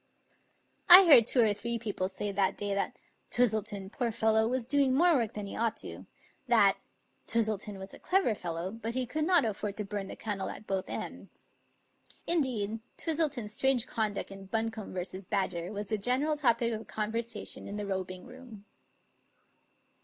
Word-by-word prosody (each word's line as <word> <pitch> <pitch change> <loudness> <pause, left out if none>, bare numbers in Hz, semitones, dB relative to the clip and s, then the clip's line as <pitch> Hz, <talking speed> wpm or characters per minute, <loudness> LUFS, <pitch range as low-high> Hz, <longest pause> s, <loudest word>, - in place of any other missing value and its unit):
I 370 +2 +12
heard 245 -9 +8
two 250 - +4
or 215 -2 +4
three 235 +3 -3
people 205 -5 -3
say 205 +1 -3
that 195 -1 0
day 205 -1 -2
that 200 - -2 0.3
"Twis 245 -3 +3
tleton, 205 -2 -4
poor 235 -1 -2
fellow, 220 0 +2
was 250 0 -2
doing 275 0 +2
more 345 +4 +5
work 235 -7 0
than 210 -1 -4
he 200 - -7
ought 230 0 -1
to"; - - -8 0.4
that - - +4 0.5
"Twistleton 215 -3 -1
was 190 0 -9
a - - -12
clever 370 - +1
fellow, 175 -1 -4
but 230 +1 -5
he 255 -1 0
could 305 +5 -2
not 350 -5 +4
afford 210 -1 -3
to 210 - -3
bum 200 -1 -4
the - - -7
candle 205 -3 -4
at - - -9
both 190 -2 -3
ends." - - -8 0.7
Indeed, 235 -10 0 0.2
Twis 325 -2 -2
tleton's 260 -10 -1
strange 265 0 +2
conduct 215 -5 -3
in 195 0 -10
Buncombe 220 -1 -3
v. 185 +1 -4
Badger 175 -3 -2
was 205 -1 -5
the 215 - -1
general 260 +8 +1
topic 235 -5 +1
of 220 0 -6
conversation 220 0 -3
in 200 - -6
the 210 0 -4
robing 185 -2 -4
room. 245 -5 -13
220 Hz, 175 wpm, -30 LUFS, 200-250 Hz, 0.7 s, I